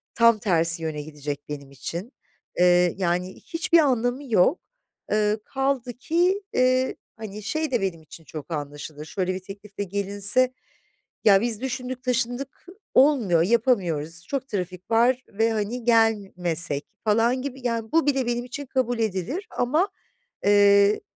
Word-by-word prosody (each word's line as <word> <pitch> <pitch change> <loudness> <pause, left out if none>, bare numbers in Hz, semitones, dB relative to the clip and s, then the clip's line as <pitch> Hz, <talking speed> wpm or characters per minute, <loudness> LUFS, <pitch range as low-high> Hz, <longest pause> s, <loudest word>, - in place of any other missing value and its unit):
tam 230 -2 +5
tersi 165 -4 +2
yöne 155 -2 -3
gidecek 145 -1 -6
benim 140 -2 -7
için. 170 - -6 0.5
Eee, 180 -1 +4
yani 180 0 -1
hiçbir 335 0 +1
anlamı 255 -2 +1
yok. 215 - +4 0.5
Iıı, 210 0 +2
kaldı 270 -2 -1
ki, 350 - +1
eee, 255 +1 +2 0.2
hani, 210 -1 -8
şey 310 +8 -2
de 245 -4 +1
benim 185 -4 -2
için 160 +1 -14
çok 155 +1 -9
anlaşılır, 145 0 -6
şöyle 185 +2 -2
bir - - -4
teklifle 200 +2 -8
gelinse: 200 +6 +2 0.7
"Ya, 195 -2 +6
biz 230 -1 -1
düşündük, 255 -1 -4
taşındık, 250 +2 -2 0.3
olmuyor, 250 - +4
yapamıyoruz, 170 - 0
çok 270 -1 -3
trafik 185 -3 -5
var 245 +3 +3
ve 225 +2 +1
hani 220 +3 -2
gelmesek." 190 -10 +2 0.2
falan 230 +4 +2
gibi... 270 -1 -5
Yani 230 -2 -3
bu 325 -2 +3
bile 270 -3 +2
benim 240 0 -1
için 280 +3 -7
kabul 245 -2 -1
edilir 220 - -2
ama, 305 +11 +1 0.6
eee, 200 0 +5
215 Hz, 140 wpm, -24 LUFS, 180-255 Hz, 0.7 s, Ya